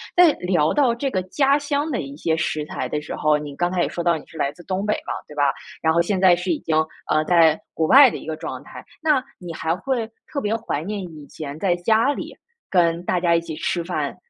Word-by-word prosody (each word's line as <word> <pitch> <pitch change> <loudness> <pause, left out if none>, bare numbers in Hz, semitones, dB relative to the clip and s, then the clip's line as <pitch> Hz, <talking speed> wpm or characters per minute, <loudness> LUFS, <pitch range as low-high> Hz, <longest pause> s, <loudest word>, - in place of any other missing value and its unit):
在 355 -3 +7
聊 175 -4 +1
到 260 -5 +3
这 270 +3 -2
个 185 - 0
家 275 +9 +2
乡 290 +1 -1
的 250 - -1
一 140 0 -8
些 160 +2 0
食 155 -1 -1
材 - - -4
的 150 - -3
时 150 - -7
候， 150 0 +3
你 145 -1 -7
刚 175 0 +1
才 180 -1 +1
也 - - -1
说 175 - -4
到 170 -1 +2
你 150 - -12
是 160 - -13
来 140 - 0
自 175 - -15
东 190 +3 -2
北 210 - +2
嘛， - - -4 0.2
对 150 - -12
吧？ 145 -2 +3 0.3
然 160 0 +3
后 170 - +4
现 185 +3 -1
在 185 -1 +6
是 180 +2 -5
已 160 - 0
经， 155 -1 0 0.3
呃， 155 0 +3
在 165 -2 +4
国 160 - 0
外 275 0 +9
的 - - -7
一 - - -11
个 160 0 -3
状 - - -6
态， - - -11 0.2
那 305 -4 +3 0.2
你 175 -2 -8
还 160 +1 -1
会 235 +2 -2 0.2
特 285 - -1
别 215 -3 -1
怀 220 -10 -3
念 205 +1 -3
以 155 -5 -10
前 145 0 -8
在 180 -1 +2
家 220 +9 +2
里 - - -7 0.3
跟 170 -2 +2
大 180 - 0
家 170 -1 +3
一 170 - +2
起 165 - -7
吃 170 +1 -1
饭 175 +1 -3
175 Hz, 275 characters per minute, -22 LUFS, 160-220 Hz, 0.3 s, 外